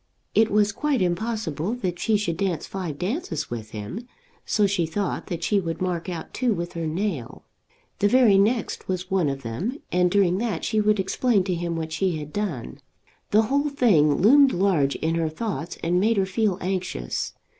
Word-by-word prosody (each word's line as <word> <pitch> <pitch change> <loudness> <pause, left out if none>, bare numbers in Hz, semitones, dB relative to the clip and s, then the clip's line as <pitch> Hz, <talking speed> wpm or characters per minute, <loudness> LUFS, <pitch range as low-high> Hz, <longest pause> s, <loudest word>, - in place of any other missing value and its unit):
It 220 0 +4
was 210 0 +3
quite 285 +4 0
impossible 185 0 -1
that 180 -7 -3
she 220 -1 +2
should 175 -5 -2
dance 185 -4 -1
five 180 -7 -5
dances 185 - -3
with 110 -2 -5
him, 110 - -7 0.4
so 210 - +3
she 190 -4 +1
thought 195 +4 -3
that 170 -1 -4
she 205 +3 +2
would 165 -3 -4
mark 180 -1 -2
out 170 -2 -6
two 245 -4 +1
with 170 0 -4
her 165 -1 -3
nail. 160 - -3 0.5
The 205 - +4
very 230 -4 +5
next 225 +3 0
was 185 0 -3
one 185 -6 +2
of 135 0 -5
them, 155 - -3
and 180 0 +3
during 190 -1 +2
that 215 -8 -2
she 215 -1 +1
would 210 0 +2
explain 200 +2 +1
to 185 -1 -1
him 170 -1 -2
what 160 -1 -4
she 180 0 0
had 150 0 -8
done. 190 - -4 0.5
The 215 +2 +4
whole 280 +6 +1
thing 185 - +4
loomed 270 +7 +6
large 175 -7 +2
in 160 +1 -1
her 165 -1 0
thoughts 175 0 -4
and 175 +2 +2
made 220 +3 +2
her 195 - +3
feel 195 0 0
anxious. 180 - -3
185 Hz, 190 wpm, -24 LUFS, 165-215 Hz, 0.5 s, loomed